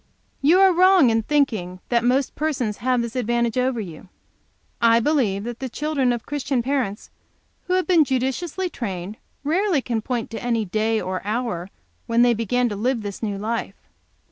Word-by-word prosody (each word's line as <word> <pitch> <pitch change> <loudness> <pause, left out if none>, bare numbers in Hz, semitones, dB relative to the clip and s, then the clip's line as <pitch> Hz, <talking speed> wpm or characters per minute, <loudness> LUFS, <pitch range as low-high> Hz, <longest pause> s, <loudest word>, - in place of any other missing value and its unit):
"You 320 +7 +5
are 380 -1 +6
wrong 365 -7 +5
in 225 0 +2
thinking 220 -10 0
that 235 -1 +2
most 255 +2 +1
persons 260 -9 -2
have 250 0 +1
this 235 0 -6
advantage 235 -1 0
over 255 -1 0
you. 180 -2 -8 0.7
I 230 0 +5
believe 230 -8 +1
that 240 0 -6
the 265 - -4
children 285 -1 0
of 240 -1 -3
Christian 275 -3 -1
parents, 255 -6 -2 0.6
who 365 - 0
have 370 0 +2
been 345 -4 +5
judiciously 270 +8 -1
trained, 200 - -5 0.3
rarely 345 +2 +1
can 235 -3 -2
point 235 0 -3
to 225 - -5
any 230 -3 0
day 220 +3 0
or 185 -1 -3
hour 210 -4 -3 0.4
when 230 +1 +3
they 245 -1 +5
began 240 +2 0
to 205 - -4
live 235 +2 -1
this 200 -1 -6
new 205 -3 -2
life. 225 +3 -3
240 Hz, 175 wpm, -22 LUFS, 220-275 Hz, 0.7 s, are